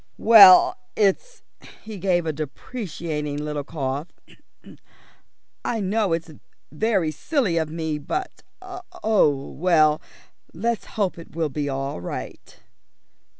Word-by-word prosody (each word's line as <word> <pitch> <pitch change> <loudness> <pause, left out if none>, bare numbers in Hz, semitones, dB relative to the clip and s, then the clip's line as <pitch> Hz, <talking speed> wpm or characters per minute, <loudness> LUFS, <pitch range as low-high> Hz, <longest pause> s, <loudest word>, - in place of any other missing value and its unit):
"Well, 205 -5 +8 0.2
it's 215 - 0 0.2
" - - -18
he 215 -3 -8
gave 175 -2 +1
a 160 - -1
deprecating 155 - -5
little 150 -1 -4
cough. 140 0 -4 1.6
"I 230 - -2
know 205 0 0
it's 165 0 -3 0.4
very 190 -2 0
silly 210 - -1
of 160 -1 -1
me 160 -1 -3
but 370 - -5 0.2
oh, 220 - -1
well, 155 -2 +3 0.5
let's 230 +6 -2
hope 195 -5 -1
it 165 - -13
will 165 -2 -1
be 145 0 -3
all 135 -7 -4
right." - - -8
170 Hz, 115 wpm, -23 LUFS, 150-215 Hz, 1.6 s, Well